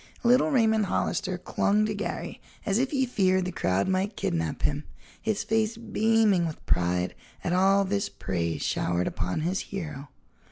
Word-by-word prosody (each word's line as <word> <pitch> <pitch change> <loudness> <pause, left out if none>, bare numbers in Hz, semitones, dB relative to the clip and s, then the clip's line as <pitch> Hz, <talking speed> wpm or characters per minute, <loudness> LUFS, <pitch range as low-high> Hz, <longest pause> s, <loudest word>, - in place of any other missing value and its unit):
Little 250 +5 +5
Raymond 220 -6 +3
Hollister 185 0 -1
clung 205 +3 +1
to 215 - -1
Garry 205 - -4 0.2
as 200 +2 +2
if 260 +1 +1
he 265 -3 +1
feared 185 -6 +2
the 180 - -2
crowd 95 - 0
might 190 +2 0
kidnap 80 -2 -2
him, 145 +1 0 0.4
his 215 -2 -1
face 220 0 0
beaming 220 -4 +2
with 155 - -8
pride 90 +1 +1 0.3
at 175 - 0
all 195 +2 +4
this 200 +1 -1
praise 85 -4 -3
showered 90 0 0
upon 90 - -2
his 180 +4 0
hero. 150 -8 -6
190 Hz, 160 wpm, -27 LUFS, 145-215 Hz, 0.4 s, Little